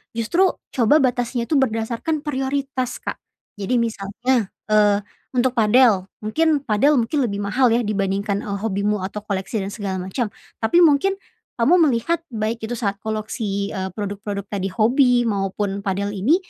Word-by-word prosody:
Justru, 285 - +2 0.2
coba 260 +5 +4
batasnya 245 -1 0
itu 300 - +3
berdasarkan 245 +5 -1
prioritas, 270 -3 -2
Kak. - - -4 0.4
Jadi 205 +5 -1
misalnya, 230 +2 -1 0.2
eee, 210 -1 +4 0.3
untuk 250 +1 +3
padel, 225 -4 +4 0.2
mungkin 300 +6 +1
padel 265 +5 +3
mungkin 245 +4 +1
lebih 205 -6 -1
mahal, 250 +6 +2
ya, 240 - +1
dibandingkan, 200 -1 -1
eee, 200 -1 -2
hobimu 205 -1 0
atau 195 +2 -4
koleksi 200 +1 -3
dan 195 0 -4
segala 195 -4 -3
macam, 210 +3 -2 0.3
tapi 220 +10 +4
mungkin 350 +4 +4 0.4
kamu 275 +9 +4
melihat 280 +6 0 0.2
baik 220 +2 -1
itu 240 - -3
saat 200 -4 -2
koleksi, 215 -2 -3
eee, 190 -2 -3
produk-produk 205 0 -4
tadi 195 -1 -3
hobi 240 +5 +3
maupun 200 -2 -1
padel 200 0 -2
ini, 210 - +2
220 Hz, 150 wpm, -21 LUFS, 200-255 Hz, 0.4 s, coba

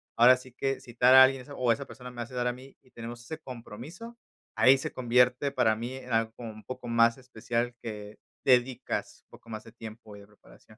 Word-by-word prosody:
ahora 125 +2 +7
sí 130 0 -13
que 135 +2 -2
citar 125 +2 +3
a 130 - +11
alguien 130 0 +2
esa 140 +3 -11
o 125 -2 +2
esa 125 +5 -1
persona 125 -1 -10
me 125 - -15
va - - -3
a - - -8
citar 125 -1 -2
a 125 - 0
mí, 130 +2 -14
y 130 - -27
tenemos 120 +1 -8
ese 160 +6 -7
compromiso. 140 - -10 0.4
Ahí 130 +1 +6
se 135 - -5
convierte 125 +2 +2
para 110 -4 +2
mí 120 +4 -5
en 130 - -7
algo 115 0 +1
como 115 -2 -7
un 110 0 -13
poco 130 -1 -8
más 115 +1 +3
especial 120 -1 -3
que 105 -2 -8 0.3
dedicas, 125 -1 0
poco 115 - -16
más 110 -1 -6
de 115 - -14
tiempo 110 -1 -11
y - - -12
de 100 - -15
preparación. 105 0 -20
125 Hz, 230 wpm, -28 LUFS, 115-130 Hz, 0.4 s, a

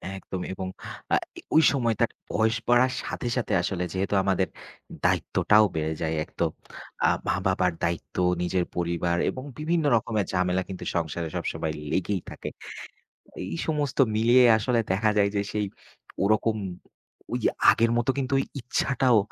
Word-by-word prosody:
একদমই 95 -1 -6
এবং 95 0 -5 0.5
আ - - +7 0.2
ই - - -8
ওই 160 - +8
সময়টা 120 -4 +2 0.3
বয়স 110 +1 +2
বাড়ার 125 +2 +4
সাথে, - - -4
সাথে 115 -3 -1
আসলে 90 0 -2
যেহেতু 95 +2 -1
আমাদের 95 -1 +1 0.6
দায়িত্বটাও 105 0 +4
বেড়ে 80 0 -1
যায়। 80 -1 0
এক - - -14
তো - - +3 0.6
আ - - +5 0.2
মা-বাবার 95 -1 +1
দায়িত্ব, 85 0 -2 0.2
নিজের 90 0 0
পরিবার 85 0 0
এবং 130 - -5 0.2
বিভিন্ন 160 +1 0
রকমের 110 -2 0
ঝামেলা 90 0 +1
কিন্তু 95 - -6
সংসারে 85 0 -2
সবসময় 80 -1 -2 0.2
লেগেই 95 0 0
থাকে। - - -6 1.0
এই - - -2
সমস্ত 150 -4 -1 0.2
মিলিয়ে 120 +3 +5
আসলে 120 +1 +1
দেখা 105 +3 +2
যায়, 100 -1 +3
যে 100 - +2
সেই 105 -1 0 0.6
ওরকম 110 +2 +2 0.8
ওই - - -1 0.3
আগের 115 +1 +3
মত 120 +1 0
কিন্তু 135 0 -2
ওই - - +1 0.2
ইচ্ছাটাও 125 0 +2
105 Hz, 145 wpm, -26 LUFS, 90-120 Hz, 1.0 s, ওই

